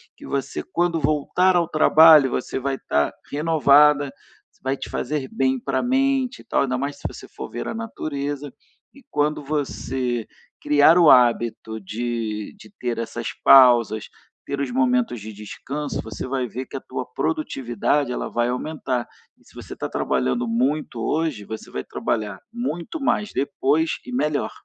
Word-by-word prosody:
Que - - -13
você, 140 -1 -3
quando 170 -2 -1
voltar 155 +5 +2
ao 170 -2 +1
trabalho, 155 -2 +7
você 125 - -3
vai 135 +1 -1
estar 75 - 0 0.2
renovada, 150 -1 +4 0.4
isso - - -34
vai 135 +1 -1
te - - -7
fazer 145 -3 -3
bem 130 -1 0
pra 135 +1 -1
mente 265 0 +1
e - - -20
tal, - - +1
ainda 130 -2 0
mais 140 +2 -3
se - - -18
você - - -6
for - - -8
ver - - -5
a - - -3
natureza. 145 - -5 0.4
E 275 - -17
quando 150 0 0
você 130 -5 -2 0.4
criar 150 +3 +5
o 170 -4 +7
hábito 120 -3 +3
de 110 - -4
de - - -15
ter 120 -2 -2
essas 115 0 -4
pausas, 120 -5 +6 0.4
ter 140 - -4
os 140 -3 -2
momentos 125 -2 +1
de 110 +2 -7
descanso, 140 +8 -5
você 110 +2 -6
vai 130 -1 -2
ver 125 +3 -6
que - - -11
a 135 - -4
tua 125 - -5
produtividade, 135 -2 -1
ela - - -3
vai 120 +1 0
aumentar. 125 -2 -3 0.3
E - - -29
se - - -21
você - - -9
está - - -4
trabalhando 65 - -1
muito 125 +2 -1
hoje, 150 -4 -1
você 110 +1 -8
vai 65 - -4
trabalhar 105 -3 -3
muito 235 - -4
mais 210 -6 0
depois 145 +3 +1
e 255 - -8
melhor. 150 - -1
135 Hz, 165 wpm, -23 LUFS, 120-155 Hz, 0.4 s, trabalho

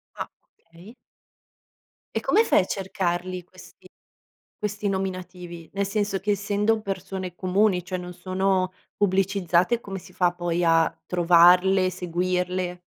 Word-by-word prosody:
Ah, - - -5 0.3
okay. 170 +7 -16 1.2
E - - +2
come 445 - +3
fai - - +4
a 185 - +1
cercarli 185 -2 -2
questi 185 +1 -16 0.7
questi 210 -1 -2
nominativi? 180 -3 -5
Nel 200 0 0
senso 205 -1 -1
che 205 +2 -2
essendo 205 +2 +1
persone 190 -2 -5
comuni, 185 0 +1
cioè 185 0 -3
non 180 0 -7
sono 185 +1 0 0.2
pubblicizzate 195 +1 +2
come 195 -3 -6
si 180 +1 -14
fa 175 -1 +2
poi 175 0 -2
a 165 -1 +4 0.2
trovarle, 180 +2 +5
seguirle? 180 0 -2
185 Hz, 125 wpm, -25 LUFS, 180-195 Hz, 1.2 s, trovarle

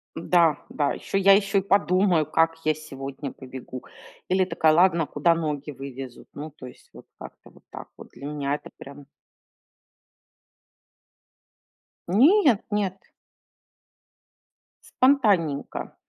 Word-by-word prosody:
Да 165 -2 +2
да, 145 -2 -1
ещё - - -4
я 195 0 +6
ещё 200 0 +2
и - - -3
подумаю, 185 -4 +2
как 165 +2 +1
я 155 - +3
сегодня 140 -2 -8
побегу. 130 -1 -10 0.5
Или 185 0 +2
такая: 165 -3 +2
"Ладно, 170 -1 +3
куда 165 +4 +1
ноги 150 -2 -4
вывезут?" 135 -2 -9
Ну, 150 +2 -7
то 140 -3 -13
есть, 125 - -14
вот - - -14
как-то - - -13
вот - - -22
так - - -10
вот. - - -13
Для 140 - -12
меня 145 -1 -2
это - - -10
прям 140 0 -12 3.0
Нет 260 - +4
нет. 200 -2 -1 2.0
Спонтанненько. 205 - +1
160 Hz, 120 wpm, -24 LUFS, 140-190 Hz, 3.0 s, я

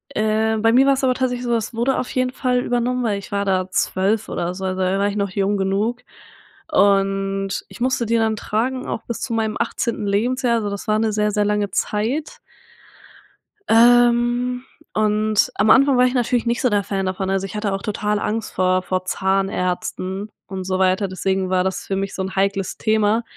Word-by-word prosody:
äh, 220 +1 +1
bei 225 +1 +3
mir 265 +2 +5
war's 275 -1 +2
aber 255 -1 +2
tatsächlich 250 -1 -1
so, 240 -1 +1
es 225 +1 -3
wurde 240 +4 0
auf 255 - -4
jeden 255 -1 0
Fall 250 -1 0
übernommen, 245 +1 -1
weil 210 -4 0
ich 200 - -12
war 200 0 -1
da 185 -1 +1
12 200 +5 0
oder 175 +1 -2
so, 190 0 -5
also 185 0 -2
da 185 +1 +1
war 200 - +2
ich 200 - -5
noch 200 -2 -1
jung 200 +2 0
genug 200 +5 -1 0.7
und 195 -3 +1
ich - - -13
musste 255 -1 +1
die 230 +1 +1
dann 220 -1 +1
tragen, 250 +5 -2
auch - - -4
bis 235 - -4
zu 235 - -3
meinem 220 -1 -1
18. 235 -2 -2
Lebensjahr. 240 +4 +1
Also 210 -2 -2
das 200 +1 -6
war 215 0 +2
'ne 220 -1 +1
sehr, 210 0 +1
sehr 210 0 +1
lange 210 -1 0
Zeit. 230 +11 -2 1.3
Ähm, 240 +1 +4 0.3
und 215 0 +1
am 210 +2 +2
Anfang 275 +2 +5
war 250 - +5
ich 250 - +1
natürlich 245 -1 0
nicht 235 0 0
so 250 - +3
der 205 -2 +1
Fan 195 0 -2
davon. 190 0 -2
Also, 195 0 0
ich 195 - -8
hatte 210 -2 -1
auch 195 - -3
total 210 0 -1
Angst 220 +1 -3
vor 185 0 +2
vor 185 0 -2
Zahnärzten 190 +1 -2 0.2
und 190 -1 -5
so 185 0 -2
weiter, 190 +2 +2
deswegen 190 0 -1
war 185 -1 +2
das 190 - -3
für 195 - -2
mich 195 0 -3
so - - -3
'n 190 +1 -4
heikles 195 0 -1
Thema. 220 +1 +1
210 Hz, 205 wpm, -21 LUFS, 195-235 Hz, 1.3 s, mir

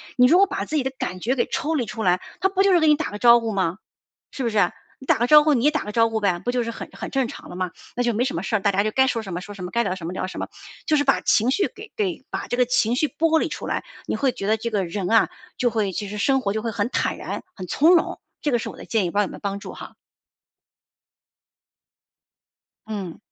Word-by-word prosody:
你 250 - +6
如 330 +8 +6
果 395 - +6
把 390 - -3
自 310 - -4
己 275 - +1
的 265 - -2
感 180 0 -4
觉 250 +7 0
给 245 - +1
抽 320 -1 -2
离 250 -6 0
出 225 -1 -6
来， 180 -2 +2 0.2
他 385 - +3
不 385 0 +2
就 395 - +4
是 350 - +6
给 315 - +3
你 300 - +6
打 315 - -3
个 205 - -6
招 235 0 +7
呼 225 -1 -3
吗？ 185 -3 0 0.5
是 270 - -5
不 235 - 0
是？ 200 -5 +3 0.3
你 265 - -13
打 - - +3
个 240 - +2
招 300 +3 +8
呼， 310 - +4
你 245 -3 +1
也 300 - +6
打 300 - -2
个 210 - -6
招 230 +1 +4
呼 220 -1 -2
呗， 185 -4 +1
不 245 - -1
就 245 -1 0
是 230 - -3
很 - - -7
很 - - -6
正 265 -3 0
常 280 - -10
了 - - -8
吗？ 185 -2 -2 0.3
那 245 - +1
就 240 -2 +1
没 240 +4 +1
什 - - -2
么 165 - -2
事 220 +3 0
儿， - - -1
大 200 - +2
家 200 +1 +2
就 215 - 0
该 265 +2 +4
说 230 -3 0
什 190 -4 -6
么 180 - -4
说 205 - -9
什 195 - -9
么， 180 - -5
该 235 0 +1
聊 185 - -1
什 170 -3 -7
么 180 - -4
聊 185 - -2
什 185 - -8
么， - - -4 0.4
就 305 - +3
是 290 - +2
把 270 - +3
情 230 +4 +3
绪 390 +9 +1
给 425 +1 -12
给 365 -10 -2
把 - - -4
这 245 - -1
个 250 - +4
情 245 -1 +1
绪 305 - +2
剥 320 +2 +2
离 - - 0
出 - - -6
来， - - -2 0.2
你 - - -1
会 265 -3 +1
觉 195 - -5
得 220 +1 +3
这 235 +1 -4
个 195 -4 0
人 180 +2 -3
啊， 225 - +5 0.3
就 245 - +3
会 215 -4 -1
就 200 +2 -4
是 210 - -6
生 270 +6 +2
活 200 -5 -1
就 220 - -2
会 230 - -2
很 215 0 -1
坦 - - -1
然、 - - -5
很 185 - -7
从 315 - +4
容， 335 - +1 0.2
这 295 - 0
个 240 - +3
是 - - -5
我 - - -12
的 - - -10
建 220 -4 +1
议， 175 - -1
不 200 - -2
知 - - +6
道 - - +3
有 - - -4
没 - - -10
有 - - -10
帮 200 -1 -3
助 - - -8
哈。 - - -10 2.9
嗯。 195 -6 -5
230 Hz, 330 characters per minute, -23 LUFS, 200-270 Hz, 2.9 s, 招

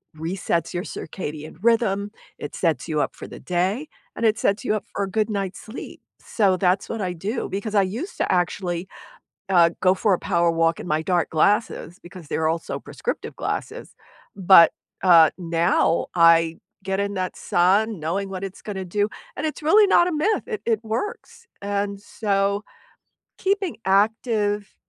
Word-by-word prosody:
resets 170 +1 -2
your 175 0 -2
circadian 155 -2 -7
rhythm, 210 -3 +1 0.3
it 145 - -7
sets 160 -7 0
you 155 -2 0
up - - -2
for - - -9
the - - -10
day, 190 - -1 0.3
and 230 - -2
it 220 -1 +3
sets 205 +2 0
you 215 - +1
up 210 - -3
for 200 - -1
a - - -7
good 215 +1 0
night's 195 -2 -3
sleep. 225 +4 -9 0.2
So 195 -4 +1
that's 185 +1 +1
what 225 - -3
I 180 -2 -2
do, 205 +8 -3
because 205 +3 -4
I 200 - +5
used 245 - -5
to - - -1
actually, 180 0 -1 0.6
uh, 170 -3 +5
go 185 0 +4
for 195 +1 +2
a - - -1
power 170 -2 +3
walk 165 0 +1
in - - -7
my 155 -2 0
dark 175 +1 +1
glasses, 180 0 +1
because 175 -3 -12
they're 160 +2 0
also 165 +1 -2
prescriptive - - -5
glasses, - - -5 0.4
but, 185 -3 +7 0.3
uh, 170 -4 +7
now 170 -1 +1
I 165 -1 +5 0.3
get 195 +1 -1
in 200 0 -2
that 185 -1 -3
sun 200 +4 +2
knowing 185 +6 -2
what 190 0 -5
it's 195 0 -8
gonna 195 -3 -5
do, 205 +3 0 0.3
and - - -4
it's 310 - -5
really 410 +7 +6
not 345 - +5
a - - -2
myth, 355 +8 0
it 440 -3 -5
it 225 -1 0
works, 420 - -5
and 200 0 -2
so 200 -1 -1 0.8
keeping 390 -2 -1
active, 205 +1 +1
195 Hz, 175 wpm, -23 LUFS, 175-215 Hz, 0.8 s, but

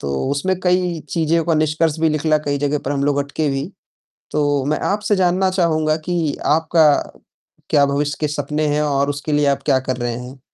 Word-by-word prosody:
तो 70 -1 -3 0.2
उसमें 180 +6 -1
कई 180 -2 +1
चीज़ों 165 0 +1
का 165 0 +1
निष्कर्ष 155 +1 +1
भी 160 - +3
निकला, 155 0 +1
कई 145 -1 -2
जगह 145 +1 0
पर 140 - 0
हम 140 -1 -1
लोग 145 0 +1
अटके 145 +2 -2
भी, 135 +5 -3 0.6
तो 145 -2 0
मैं 150 +1 0
आपसे 205 0 0
जानना 185 +1 +2
चाहूँगा 155 -4 +1
कि 165 -5 0 0.2
आपका 160 0 +3 0.8
क्या 145 -1 +4
भविष्य 145 +1 -1
के 150 - 0
सपने 150 +1 -2
हैं 150 - +1
और 140 -1 +1
उसके 145 +2 -4
लिए 145 0 +2
आप 140 - 0
क्या 135 -3 +4
कर 130 0 -3
रहे 120 -1 -2
हैं? 125 +2 -10
150 Hz, 200 wpm, -19 LUFS, 140-165 Hz, 0.8 s, क्या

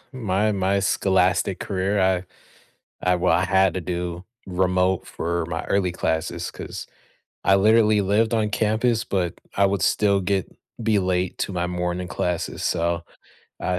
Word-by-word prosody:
my 105 -3 0
my 100 0 +1
scholastic 95 -1 +2
career, 100 +1 -1
I 95 -1 +2 0.8
I 90 0 +3
well, 90 - +2
I 90 +1 +2
had 95 -1 +3
to 95 - -2
do 85 +1 -4 0.2
remote 90 0 +1
for 85 0 -2
my 80 -1 -4
early 95 -3 0
classes 80 -2 -2
'cause - - -7 0.6
I 95 - +5
literally 110 +1 +4
lived 105 +4 +2
on 110 -2 +1
campus, 110 +2 +1
but 90 -3 -1 0.2
I 100 - +4
would 100 -1 -1
still 100 0 +3
get 95 0 -1 0.3
be 110 -2 +2
late 90 -1 -1
to 100 - -2
my 90 -1 -1
morning 90 0 -2
classes. 90 -2 -3
So, 85 +1 0 0.6
I 90 -1 -1
95 Hz, 150 wpm, -23 LUFS, 90-100 Hz, 0.8 s, I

